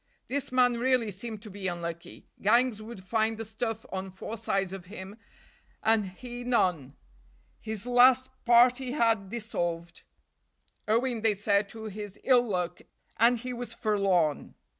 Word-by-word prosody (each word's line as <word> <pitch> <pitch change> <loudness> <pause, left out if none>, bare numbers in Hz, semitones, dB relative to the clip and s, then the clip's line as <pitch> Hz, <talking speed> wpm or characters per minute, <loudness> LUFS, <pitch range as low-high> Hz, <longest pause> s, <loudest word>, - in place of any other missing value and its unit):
This 275 0 -2
man 250 -2 +3
really 250 -3 +2
seemed 215 +2 -6
to 215 - -10
be 195 -1 -5
unlucky. 170 -1 -6 0.2
Gangs 235 +1 +3
would 215 -3 -9
find 220 +2 0
the 225 - -5
stuff 225 0 -4
on 190 0 -4
four 190 +4 -7
sides 195 -3 -1
of 190 -2 -8
him, 190 0 -9 0.7
and 220 -2 +3
he 240 +6 -8
none; 180 - +1 0.6
his 220 -1 -5
last 250 +1 +5
party 250 +2 +4
had 225 -8 +1
dissolved, 175 -6 -4 0.9
owing 230 +1 +1
they 220 -1 +3
said 200 0 +1
to 220 +1 -9
his 205 -2 -7
ill 255 -2 +5
luck, 180 -2 -2 0.4
and 235 +3 +5
he 250 +2 -5
was 245 0 -6
forlorn. 195 -8 +1
220 Hz, 145 wpm, -28 LUFS, 190-240 Hz, 0.9 s, last